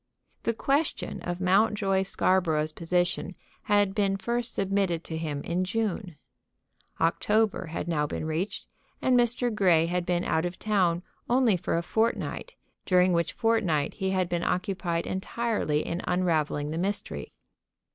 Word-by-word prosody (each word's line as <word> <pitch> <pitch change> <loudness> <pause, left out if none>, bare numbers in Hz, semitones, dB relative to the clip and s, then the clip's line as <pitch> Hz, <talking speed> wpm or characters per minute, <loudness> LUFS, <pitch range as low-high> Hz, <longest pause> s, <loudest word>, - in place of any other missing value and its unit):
The 230 - 0
question 285 +6 -1
of 175 0 -4
Mountjoy 195 +1 +2
Scarborough's 175 -5 +2
position 175 +3 -1 0.3
had 205 -2 +3
been 195 -1 +1
first 235 +3 -2
submitted 195 -4 0
to 160 - -5
him 155 -3 -3
in 175 +2 -1
June. 195 -3 -2 0.8
October 210 +4 +1
had 165 +1 -4
now 150 -3 0
been 155 - -4
reached 170 +6 -3 0.3
and 255 - +2
Mr. 240 0 +2
Grey 180 -6 +4
had 175 +1 -1
been 175 0 0
out 160 - +1
of 175 - -8
town 180 -5 +1 0.3
only 245 -4 +4
for 170 -1 -1
a 170 - -1
fortnight, 230 - -1 0.3
during 180 0 +4
which 170 -1 0
fortnight 195 -11 +1
he 190 -2 -2
had 185 -1 +1
been 175 0 -2
occupied 180 -3 -1
entirely 190 -5 -1
in 170 - -3
unravelling 155 -5 0
the 160 - -2
mystery. 200 +3 -3
185 Hz, 145 wpm, -27 LUFS, 170-210 Hz, 0.8 s, Grey